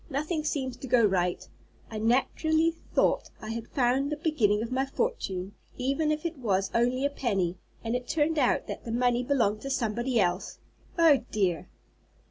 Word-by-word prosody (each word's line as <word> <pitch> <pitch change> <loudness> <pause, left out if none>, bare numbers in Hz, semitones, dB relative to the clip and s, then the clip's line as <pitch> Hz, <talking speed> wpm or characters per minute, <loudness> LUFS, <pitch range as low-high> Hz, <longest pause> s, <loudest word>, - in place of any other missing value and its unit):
Nothing 305 +3 -2
seems 265 -4 -2
to 265 - -8
go 240 -2 +4
right. 180 -3 0 0.4
I 215 - -4
naturally 315 +8 +2
thought 330 - 0
I 215 - -6
had 230 0 -5
found 265 +2 +1
the - - 0
beginning 225 -10 +1
of 235 - -6
my 260 +1 +1
fortune, 270 - -2 0.2
even 275 +4 0
if 305 +2 -2
it 330 -4 -3
was 195 -5 0
only 245 +3 +2
a - - +3
penny, 195 -10 -1 0.2
and 230 +1 -1
it 250 0 -3
turned 315 0 +1
out 255 - +2
that - - -6
the 230 - -5
money 245 +1 +2
belonged 230 -6 +1
to 275 - -5
somebody 240 -1 0
else. 180 -1 0 0.4
Oh 325 -4 +6
dear!" 185 -6 0
250 Hz, 175 wpm, -28 LUFS, 215-285 Hz, 0.4 s, Oh